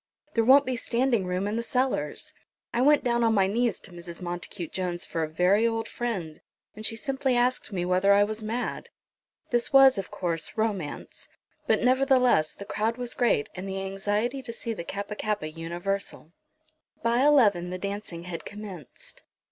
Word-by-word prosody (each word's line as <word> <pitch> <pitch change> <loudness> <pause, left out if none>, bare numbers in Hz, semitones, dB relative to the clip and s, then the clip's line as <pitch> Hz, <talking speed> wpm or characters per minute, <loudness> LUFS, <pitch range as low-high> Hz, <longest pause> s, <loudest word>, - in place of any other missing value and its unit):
"There 230 - +3
won't 275 +4 +7
be 255 - -1
standing 235 -3 +1
room 180 +2 -1
in 210 +2 -1
the - - 0
cellars. 250 - -1 0.4
I 235 - +1
went 295 +2 +5
down 235 -1 +1
on 225 -1 +3
my 195 -2 +4
knees 230 +2 0
to 195 - -9
Mrs. 170 -1 -9
Montacute 175 0 -5
Jones 180 -2 -2
for 165 - -3
a 155 - -1
very 185 +8 +3
old 225 -1 -2
friend, 190 -11 -4 0.3
and 215 - -9
she 225 - -1
simply 265 +2 0
asked 245 -1 +1
me 180 -3 -2
whether 185 +2 +3
I 200 0 +6
was 215 +1 -3
mad." 225 +3 -3 0.6
This 240 -1 +1
was, 270 -4 +7
of 195 - -5
course, 165 0 -3
romance; 205 -9 -3 0.4
but, - - +2
nevertheless, 255 - +3
the 200 - -9
crowd 220 +3 -1
was 245 -1 -4
great, 235 - +2
and 190 +2 -6
the 195 0 -3
anxiety 205 +7 -1
to 235 - -7
see 230 0 -4
the 185 - -6
Kappa 200 +4 -5
kappa 205 -7 -2
universal. 170 +1 -4 0.7
By 235 +1 +2
eleven 210 -12 +4
the 185 - -4
dancing 200 -3 -5
had 175 -1 -6
commenced. 200 - -8
205 Hz, 180 wpm, -27 LUFS, 180-240 Hz, 0.7 s, won't